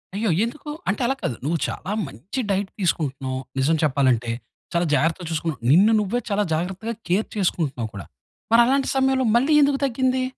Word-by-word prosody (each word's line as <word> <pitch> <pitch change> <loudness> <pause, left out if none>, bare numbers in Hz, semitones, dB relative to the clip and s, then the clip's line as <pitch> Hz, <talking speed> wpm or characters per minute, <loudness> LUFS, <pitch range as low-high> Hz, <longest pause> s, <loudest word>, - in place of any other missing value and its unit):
అయ్యో! 215 +1 0
ఎందుకు 295 +6 -5 0.2
అంటే 205 - -1
అలా 270 +2 +1
కాదు 120 - -2
నువ్వు 165 +3 +1
చాలా 195 - -5 0.2
మంచి 140 - -7
డైట్ 195 0 -1
తీసుకుంటున్నావు 135 -7 -1 0.2
నిజం 150 +5 +3
చెప్పాలంటే. 130 -5 +2 0.4
చాలా 170 0 +2
జాగ్రత్తగా 165 +4 +1
చూసుకున్నా, 160 -2 -2
నిన్ను 195 +8 +6
నువ్వే 210 +4 0
చాలా 205 0 +1
జాగ్రత్తగా 190 +8 -2
కేర్ 190 +5 +1
చేసుకుంటున్నావు 150 - -1
కూడా, 95 - -7 0.5
మరి 230 +1 +7
అలాంటి 270 +1 +2
సమయంలో 265 -1 +2
మళ్ళి 270 +6 +3
ఎందుకు 280 -1 +3
తగ్గింది? 260 0 +1
190 Hz, 160 wpm, -23 LUFS, 150-240 Hz, 0.5 s, మరి